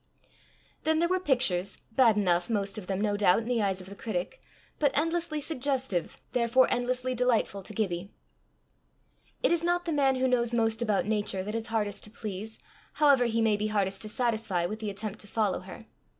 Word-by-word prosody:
Then 315 Hz, 0 st, +2 dB
there 340 Hz, +2 st, +3 dB
were 370 Hz, +1 st, +1 dB
pictures, 245 Hz, -, +2 dB
bad 225 Hz, -2 st, +4 dB
enough 180 Hz, -2 st, +2 dB
most 205 Hz, -1 st, -1 dB
of 185 Hz, -, -11 dB
them, 195 Hz, 0 st, -1 dB
no 210 Hz, -1 st, +1 dB
doubt, 200 Hz, -3 st, +4 dB
in -, -, -8 dB
the 240 Hz, -1 st, 0 dB
eyes 190 Hz, -2 st, 0 dB
of 185 Hz, -, -12 dB
the 200 Hz, -, -9 dB
critic, 200 Hz, -, -4 dB, 0.4 s
but 290 Hz, -, +4 dB
endlessly 330 Hz, 0 st, 0 dB
suggestive, 265 Hz, -, -1 dB
therefore 245 Hz, +1 st, +3 dB
endlessly 250 Hz, +1 st, 0 dB
delightful 240 Hz, -5 st, +1 dB
to 195 Hz, -, -9 dB
Gibbie. 195 Hz, -3 st, -2 dB, 1.3 s
It -, -, +3 dB
is 340 Hz, -1 st, +2 dB
not 350 Hz, +1 st, +1 dB
the 335 Hz, -, -1 dB
man 275 Hz, -2 st, +3 dB
who 260 Hz, 0 st, +1 dB
knows 240 Hz, -2 st, +1 dB
most 225 Hz, 0 st, +1 dB
about 215 Hz, -4 st, +1 dB
Nature 205 Hz, -3 st, -1 dB
that 210 Hz, +2 st, -5 dB
is 225 Hz, 0 st, -3 dB
hardest 210 Hz, -3 st, -2 dB
to -, -, -10 dB
please, 215 Hz, 0 st, -6 dB, 0.4 s
however 280 Hz, -5 st, +4 dB
he 230 Hz, -1 st, +1 dB
may 220 Hz, -2 st, +3 dB
be 210 Hz, +1 st, -1 dB
hardest 195 Hz, -2 st, -1 dB
to 215 Hz, -, -4 dB
satisfy, 220 Hz, -7 st, 0 dB
with 215 Hz, +5 st, -4 dB
the 215 Hz, -1 st, -3 dB
attempt 205 Hz, +1 st, -5 dB
to 205 Hz, -, -8 dB
follow 210 Hz, -2 st, 0 dB
her. 190 Hz, +5 st, -11 dB
220 Hz, 195 wpm, -28 LUFS, 200-255 Hz, 1.3 s, bad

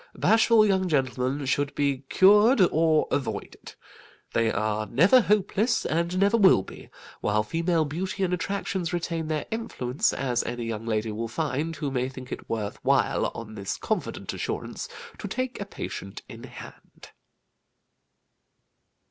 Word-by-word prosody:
Bashful 225 Hz, 0 st, +4 dB
young 190 Hz, -2 st, +2 dB
gentlemen 135 Hz, -1 st, 0 dB
should 140 Hz, +2 st, 0 dB
be 140 Hz, -2 st, +1 dB
cured, 210 Hz, +6 st, +6 dB
or 160 Hz, -1 st, +3 dB
avoided. 140 Hz, -, -4 dB, 0.6 s
They 115 Hz, -1 st, +2 dB
are 110 Hz, +1 st, -1 dB
never 180 Hz, -, +5 dB
hopeless, 210 Hz, +2 st, +1 dB
and 170 Hz, +3 st, -1 dB
never 200 Hz, +4 st, +3 dB
will 190 Hz, -, +5 dB
be, -, -, -12 dB, 0.3 s
while 105 Hz, +1 st, +1 dB
female 165 Hz, +6 st, 0 dB
beauty 185 Hz, +6 st, -3 dB
and 180 Hz, -1 st, 0 dB
attractions 185 Hz, -1 st, -2 dB
retain 165 Hz, -2 st, -2 dB
their 155 Hz, -1 st, -2 dB
influence, 145 Hz, -, -1 dB
as 125 Hz, -3 st, -1 dB
any 120 Hz, 0 st, -4 dB
young 115 Hz, 0 st, -5 dB
lady 110 Hz, 0 st, -1 dB
will 115 Hz, +2 st, -3 dB
find, 150 Hz, +5 st, -2 dB
who 145 Hz, -2 st, -3 dB
may 130 Hz, 0 st, -1 dB
think 130 Hz, -1 st, -10 dB
it -, -, -7 dB
worth 105 Hz, -3 st, -4 dB
while -, -, +2 dB
on 110 Hz, -2 st, -8 dB
this 100 Hz, -3 st, -4 dB
confident -, -, -3 dB
assurance -, -, -4 dB, 0.3 s
to -, -, -5 dB
take 255 Hz, +5 st, -3 dB
a -, -, -3 dB
patient -, -, -7 dB
in -, -, -10 dB
hand. -, -, -13 dB
155 Hz, 145 wpm, -26 LUFS, 120-190 Hz, 0.6 s, cured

